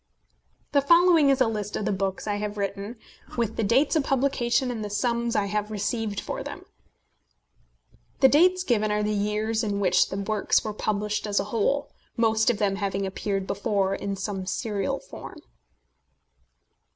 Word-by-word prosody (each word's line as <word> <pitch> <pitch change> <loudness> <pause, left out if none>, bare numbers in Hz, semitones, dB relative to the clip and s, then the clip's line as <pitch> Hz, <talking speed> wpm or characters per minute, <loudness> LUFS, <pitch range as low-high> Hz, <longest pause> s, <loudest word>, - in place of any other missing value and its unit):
The 285 - +4
following 335 0 +5
is 270 -1 +3
a 255 - +5
list 210 -2 -3
of 210 - -2
the 215 - +1
books 195 -1 -2
I 205 -1 -1
have 210 0 -4
written, 200 +3 -3 0.4
with 230 -2 -1
the - - -1
dates 255 - +3
of 310 - +3
publication 260 -2 +1
and 225 -3 -4
the 210 - -4
sums 235 +2 -1
I 205 - +2
have 210 +1 -2
received 210 0 -2
for - - -5
them. - - -8 1.5
The 265 - +7
dates 365 +6 +4
given 215 - +1
are 210 0 +1
the 210 0 0
years 210 +2 0
in 205 -2 -1
which 180 -2 +3
the 190 - -4
works 205 +1 +1
were 215 - -4
published 210 0 -2
as 205 -1 +1
a - - 0
whole, 275 +6 0 0.3
most 220 0 +3
of 240 - +1
them 200 -1 0
having 195 -1 -2
appeared 195 0 -2
before 195 -1 0
in 200 0 -3
some 195 -1 -4
serial 205 -3 -2
form. - - -10
210 Hz, 175 wpm, -26 LUFS, 200-235 Hz, 1.5 s, The